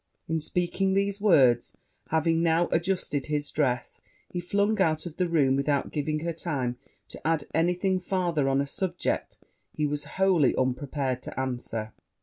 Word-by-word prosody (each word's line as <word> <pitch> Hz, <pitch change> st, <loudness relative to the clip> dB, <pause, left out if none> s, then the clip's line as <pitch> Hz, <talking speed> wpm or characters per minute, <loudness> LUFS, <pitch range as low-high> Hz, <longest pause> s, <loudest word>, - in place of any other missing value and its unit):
In 160 Hz, 0 st, 0 dB
speaking 180 Hz, +4 st, 0 dB
these 200 Hz, +1 st, 0 dB
words, 130 Hz, -, +4 dB, 0.3 s
having 165 Hz, +1 st, +2 dB
now 170 Hz, +1 st, +3 dB
adjusted 170 Hz, -5 st, 0 dB
his 150 Hz, -1 st, -2 dB
dress, 125 Hz, -5 st, -1 dB, 0.3 s
he 175 Hz, -, -4 dB
flung 200 Hz, +4 st, +1 dB
out 155 Hz, -2 st, +2 dB
of 165 Hz, -3 st, -7 dB
the 180 Hz, -2 st, +1 dB
room 140 Hz, -5 st, +3 dB
without 140 Hz, 0 st, 0 dB
giving 155 Hz, 0 st, -1 dB
her 170 Hz, +1 st, -2 dB
time 135 Hz, -7 st, -2 dB, 0.3 s
to -, -, -10 dB
add 160 Hz, -2 st, +2 dB
any 170 Hz, +3 st, +2 dB
thing 190 Hz, +1 st, +1 dB
farther 175 Hz, -6 st, 0 dB
on 135 Hz, +1 st, +2 dB
a -, -, -1 dB
subject 180 Hz, +5 st, -2 dB, 0.3 s
he 150 Hz, -, -1 dB
was 145 Hz, 0 st, -2 dB
wholly 185 Hz, -8 st, +4 dB
unprepared 130 Hz, 0 st, -1 dB
to -, -, -6 dB
answer. 120 Hz, -4 st, -3 dB
155 Hz, 160 wpm, -27 LUFS, 140-180 Hz, 0.3 s, words